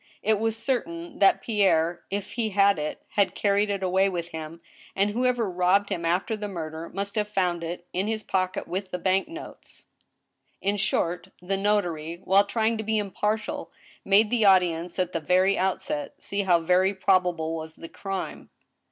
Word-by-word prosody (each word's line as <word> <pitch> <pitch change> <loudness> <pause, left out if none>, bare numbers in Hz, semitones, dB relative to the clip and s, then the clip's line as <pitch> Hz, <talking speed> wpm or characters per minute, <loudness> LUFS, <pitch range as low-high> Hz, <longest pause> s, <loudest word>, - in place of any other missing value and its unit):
It 215 -1 +2
was 225 0 0
certain 200 -9 -3
that 195 -1 +4
Pierre, 175 -6 +2
if 200 0 -4
he 230 -2 -1
had 200 -3 +4
it, 150 0 -4
had 200 -2 +1
carried 205 0 +2
it 200 -1 -2
away 190 +1 +3
with 170 -2 -4
him, 160 +1 -7 0.4
and 200 +1 +2
whoever 245 0 +1
robbed 185 +2 +2
him 170 - -3
after 180 +6 0
the 210 -1 -5
murder 165 -3 -6
must 200 +1 -4
have 210 -1 0
found 180 -4 0
it 175 +1 -5
in 190 +3 -1
his 220 -1 -2
pocket 185 -1 -1
with 190 +1 -4
the 180 - -3
bank 190 +2 +1
notes. 330 +2 -11 0.8
In 200 +1 0
short, 175 -2 0
the 185 +2 -2
notary, 175 -5 -1
while 195 +2 +4
trying 220 +1 0
to - - -2
be 220 +1 0
impartial, 210 +1 -2 0.3
made 210 +2 +4
the 240 -3 +2
audi 185 -3 +6
ence, 170 +2 -6
at 180 -1 -1
the 165 - 0
very 185 +5 +3
outset, 180 -6 -2
see 200 0 -3
how 175 -4 +3
very 185 +4 +3
probable 180 -4 +1
was 160 0 -6
the 165 - -9
crime. 195 +2 -6
190 Hz, 180 wpm, -26 LUFS, 175-205 Hz, 0.8 s, audi